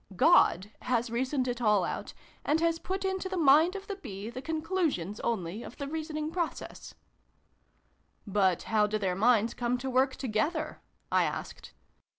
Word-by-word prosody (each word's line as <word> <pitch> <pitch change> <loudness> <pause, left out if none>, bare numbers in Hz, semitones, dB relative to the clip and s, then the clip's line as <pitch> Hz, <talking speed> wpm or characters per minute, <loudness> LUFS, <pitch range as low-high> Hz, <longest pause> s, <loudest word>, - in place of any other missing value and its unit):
God 185 +2 +4
has 240 -1 0
reasoned 255 +2 0
it 245 0 -3
all 210 -4 +4
out, - - -4 0.3
and 305 +2 +2
has 330 0 +1
put 380 +2 -3
into 380 0 -2
the 375 - -3
mind 315 +4 +5
of 395 0 -6
the 400 -2 -5
Bee 215 - -7
the 255 +2 -6
conclusions, 315 - -1
only, 210 -3 -2
of 240 - -10
the 280 - -4
reasoning 310 0 -4
process." 340 -2 -4 0.6
" - - -42
But 195 -4 +2
how 215 -1 +2
do 215 +1 -1
their 190 -3 -1
minds 225 +3 +3
come 245 0 -1
to 260 +1 -4
work 260 +1 +2
together?" 280 +7 -2 0.3
I - - +4
asked. - - -6
255 Hz, 165 wpm, -30 LUFS, 215-320 Hz, 0.6 s, mind